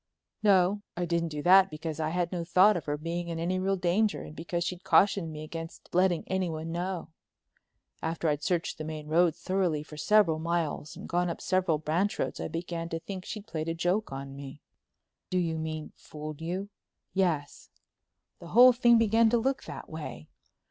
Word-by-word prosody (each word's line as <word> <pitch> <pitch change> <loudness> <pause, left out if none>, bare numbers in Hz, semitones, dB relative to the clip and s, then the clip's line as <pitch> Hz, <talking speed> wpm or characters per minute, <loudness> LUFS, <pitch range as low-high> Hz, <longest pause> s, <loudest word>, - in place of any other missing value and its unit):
"No. 200 -1 +4 0.2
I 175 - 0
didn't 170 -1 0
do 150 -1 -5
that 190 +1 +7
because 155 0 -5
I 155 0 0
had 175 0 -1
no 175 -2 -2
thought 185 +5 +5
of 170 - -3
her 145 0 -1
being 170 +3 -4
in 165 -1 -4
any 180 +3 -1
real 195 +1 +1
danger 195 +4 +1
and 150 - -10
because 170 +1 -2
she'd 180 +1 -4
cautioned 190 -1 +3
me 155 0 -7
against 165 +1 -8
letting 180 -1 +3
anyone 165 -4 -2
know. 175 +1 -3 0.9
After 165 +1 -2
I'd 150 -1 +1
searched 170 0 -1
the - - -3
main 155 -1 -6
road 165 +1 +3
thoroughly 180 -6 0
for 150 0 -12
several 175 -2 +3
miles 160 -2 -2
and - - -9
gone 175 +1 0
up 170 - -4
several 185 -4 +1
branch 165 +7 0
roads - - -2
I - - -3
began 170 0 -4
to 165 - -3
think 185 +1 -7
she'd 210 -2 -6
played 165 -6 -4
a 165 - -2
joke 180 +4 0
on 135 0 -6
me." 140 +1 -9 0.7
"Do 185 - 0
you 165 -3 0
mean 155 -1 -4
fooled 150 0 -8
you?" 185 +5 -3 0.4
"Yes—the 170 -1 -5
whole 250 +6 +8
thing 240 -1 +5
began 225 0 +4
to 240 - +3
look 265 +4 -1
that - - -8
way. 150 - -8
170 Hz, 190 wpm, -29 LUFS, 155-190 Hz, 0.9 s, whole